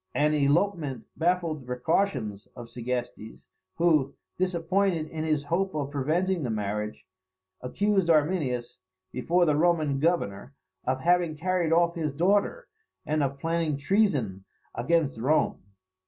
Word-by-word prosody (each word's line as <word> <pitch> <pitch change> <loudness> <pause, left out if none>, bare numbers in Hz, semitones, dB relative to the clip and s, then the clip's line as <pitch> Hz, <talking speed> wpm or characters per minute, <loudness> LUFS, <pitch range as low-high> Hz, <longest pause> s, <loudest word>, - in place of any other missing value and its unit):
An 150 +1 +3
elopement 145 - +1
baffled 170 -3 0
the - - -15
precautions 125 - -1
of 120 -1 -10
Segestes; 120 -2 -5 0.3
who, 155 -5 +2 0.2
disappointed 180 -1 +1
in 155 0 -5
his 155 -2 0
hope 175 +4 -1
of 145 -2 -2
preventing 165 +6 0
the 125 - -2
marriage, 105 0 -3 0.6
accused 195 +7 0
Arminius, 150 -7 +1 0.3
before 175 +7 +2
the 150 -3 +2
Roman 155 -4 +2
governor, 140 - -1 0.3
of 130 +1 -1
having 175 -1 +2
carried 175 0 0
off 170 +1 +3
his 155 -5 -3
daughter, 205 - +1 0.4
and 155 0 0
of 140 -1 -1
planning 165 -1 -1
treason 140 - +1 0.3
against 140 -1 0
Rome. 145 +7 +1
155 Hz, 125 wpm, -27 LUFS, 130-175 Hz, 0.6 s, An